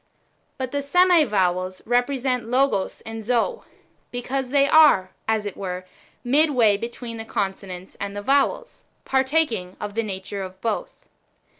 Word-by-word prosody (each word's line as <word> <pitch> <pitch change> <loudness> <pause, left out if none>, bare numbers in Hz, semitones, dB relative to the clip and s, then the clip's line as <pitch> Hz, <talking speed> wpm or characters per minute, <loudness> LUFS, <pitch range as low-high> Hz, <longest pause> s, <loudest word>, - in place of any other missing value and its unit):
But 260 -1 -4
the 285 - -1
semi 350 +2 +4
vowels^ 185 -4 0
represent 250 0 0
Logos 250 -5 +1
and 225 0 -7
Zoe, 250 - 0 0.5
because 250 +2 -3
they 280 +1 +4
are, 290 -12 +6 0.2
as 220 -1 +1
it 205 - -5
were, 185 -1 -5 0.4
midway 255 -5 +4
betw 235 +3 -6
een 230 0 -5
the 225 - -5
consonants 190 -3 -4
and 200 0 -4
the 205 - -5
vowels, 280 - 0 0.2
partaking^ 265 - 0
of 205 -1 -5
the 230 - 0
nature 195 -1 -5
of 185 0 -8
both. 220 0 -4
230 Hz, 145 wpm, -23 LUFS, 200-275 Hz, 0.5 s, are